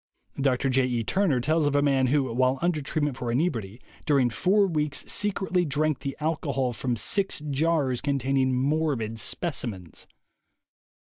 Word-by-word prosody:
Dr. 135 0 +1
J. 130 0 +3
E. 120 -2 -1
Turner 175 - +1
tells 155 +4 +1
of 145 - 0
a 145 - +4
man 135 -2 +2
who, 140 +2 +2
while 130 +2 +2
under 170 -3 +1
treatment 145 -1 -1
for 120 -2 -3
inebriety, 120 - -1 0.3
during 135 -5 +3
four 200 - +3
weeks 150 -5 -1
secretly 190 -3 +1
drank 155 -1 0
the 135 -1 -5
alcohol 140 -5 -1
from 120 +2 -2
six 195 - 0
jars 140 -3 +1
containing 135 -2 +1
morbid 130 -4 -1
specimens. 110 - -3
140 Hz, 145 wpm, -26 LUFS, 125-155 Hz, 0.3 s, a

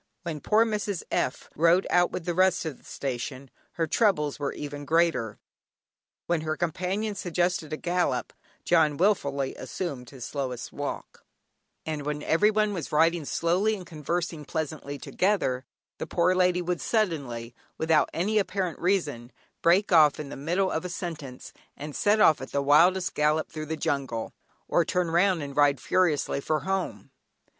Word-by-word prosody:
When 160 -4 -4
poor 220 +7 +4
Mrs. 210 -4 -2
F. 130 - -1
rode 170 +4 +4
out 175 0 +4
with 165 - -5
the 175 - -1
rest 185 0 +3
of 150 -5 -5
the - - -26
station, 130 0 -5 0.2
her 165 - 0
troubles 155 - +1
were 140 -1 -1
even 145 0 -6
greater. 160 -8 +1 0.9
When 170 -2 0
her 155 0 -2
companions 185 +5 -2
suggested 175 -2 -1
a 155 - -2
gallop, 175 -8 -1 0.3
"John" 155 -4 +3
wilfully 140 -8 +1
assumed 130 -2 -5
his 130 -4 -8
slowest 130 -4 -4
walk; - - -6 0.6
and 155 -2 -3
when 150 0 -3
everyone 210 +4 +2
was 170 -7 -5
riding 165 +1 +3
slowly 185 +9 +1
and 185 -3 -9
conversing 165 0 -3
pleasantly 145 -1 -4
together, 140 -6 0 0.3
the - - -4
poor 175 +1 +2
lady 180 -1 +2
would 175 0 -2
suddenly, 140 - -1 0.2
without 160 -1 +3
any 210 +6 +1
apparent 190 -3 -2
reason, 150 -10 -1 0.3
break 185 +5 +3
off 155 -4 +6
in 150 -2 -5
the - - -7
middle 175 +7 0
of 160 - -2
a 180 - -4
sentence, 160 -8 -7 0.2
and 150 0 -7
set 210 +1 +3
off 160 -10 +5
at 130 - -7
the 140 - 0
wildest 175 +6 +4
gallop 150 +1 +1
through 155 -1 -6
the 160 +1 -3
jungle, 135 -7 -2 0.3
or - - +3
turn 180 -2 -1
round 175 -1 +3
and 140 -1 -7
ride 145 -1 +4
furiously 160 -6 +1
for 155 +2 0
home. 190 -7 -3
165 Hz, 160 wpm, -27 LUFS, 145-180 Hz, 0.9 s, off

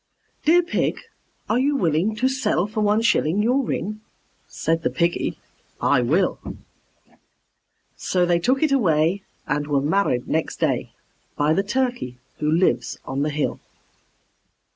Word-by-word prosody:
"Dear 345 +3 +5
Pig, 345 - -1 0.5
are 225 - +1
you 285 +2 +2
willing 180 - +1
to 245 +4 +1
sell 260 -8 0
for 215 +1 -3
one 210 +2 +2
shilling 200 -3 +2
Your 250 +5 +2
ring?" 215 -1 -3 0.5
Said 165 0 -1
the - - 0
Piggy, 170 0 -1 0.4
"I 125 - +3
will." 160 +10 +1 1.6
So 180 -1 +1
they 175 -1 +2
took 260 - +1
it 310 - +2
away 180 - +2 0.2
and 145 0 -1
were 145 -2 +2
married 145 -4 0
next 160 0 -1
day - - -1 0.4
By 150 +1 +2
the 195 - +2
Turkey 245 - -2 0.2
who 150 - 0
lives 170 +3 +1
on 135 +1 -3
the 150 - +1
hill. 150 0 -2
185 Hz, 140 wpm, -23 LUFS, 155-240 Hz, 1.6 s, Dear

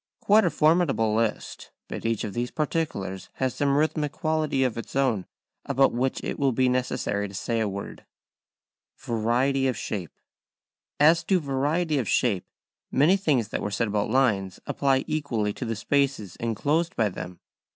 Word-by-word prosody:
Quite 210 0 +4
a - - +3
formidable 155 -10 +2
list, 110 -1 -2 0.2
but - - -4
each 115 -1 -1
of 100 - -4
these 120 +1 -2
particulars 145 - -3
has 130 -1 -1
some 140 -1 +1
rhythmic 150 -1 +1
quality 155 -4 0
of 125 -4 0
its 115 - -7
own 125 -9 +1 0.4
about 135 -1 +2
which 130 +2 -1
it - - -4
will 140 -2 +3
be 130 +2 +2
necessary 125 -5 -1
to 100 - -11
say 115 +3 -1
a 110 -2 0
word. 100 +1 -7 0.9
[Sidenote: 115 -2 -3
Variety 135 +4 +2
of 130 - -1
Shape.] 95 -6 -4 0.9
As 160 +3 +5
to 190 -2 +3
variety 150 +2 0
of 115 - -2
shape, 105 -8 +1 0.4
many 155 +8 +4
things 145 - +1
that - - -3
were 105 - -2
said 110 +2 -1
about 105 0 0
lines 105 -7 +1
apply 135 -1 +1
equally 130 -10 -1
to 125 - -5
the 115 -1 -2
spaces 130 -3 0
enclosed 145 +9 0
by 110 - +2
them. 90 -2 -7
130 Hz, 170 wpm, -26 LUFS, 110-145 Hz, 0.9 s, As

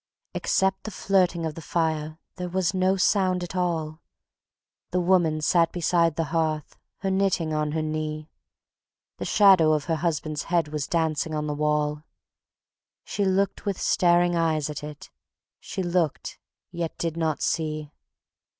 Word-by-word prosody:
Except 190 0 +1
the - - -3
flirting 180 -4 +1
of 160 - -3
the 165 - -9
fire 160 -1 -1 0.2
there 180 -1 -4
was 185 0 0
no 185 +1 +2
sound 185 -2 +2
at 175 - -7
all; 165 -3 -2 0.9
The 180 - 0
Woman 175 -4 +2
sat 165 +2 +3
beside 170 -2 +1
the 165 - 0
hearth, 155 -2 -1 0.3
her 195 - -1
knitting 190 -4 +1
on 150 -1 -1
her 160 -1 -1
knee; 155 0 -3 0.9
The - - -3
shadow 190 -7 +5
of 150 -2 0
her 165 -2 0
husband's 155 -2 -2
head 170 -3 +1
was 150 -2 -3
dancing 160 -1 0
on 150 0 -2
the 150 - -2
wall; 150 0 0 1.0
She 200 - -2
looked 195 +1 0
with 195 -2 -1
staring 175 0 +3
eyes 155 -3 0
at 145 0 -7
it, 150 -1 -9 0.5
she 190 - -5
looked 175 -3 -1 0.3
yet 170 -1 -4
did 165 -1 -2
not 160 -2 -1
see. 155 -2 -2
165 Hz, 150 wpm, -25 LUFS, 155-180 Hz, 1.0 s, shadow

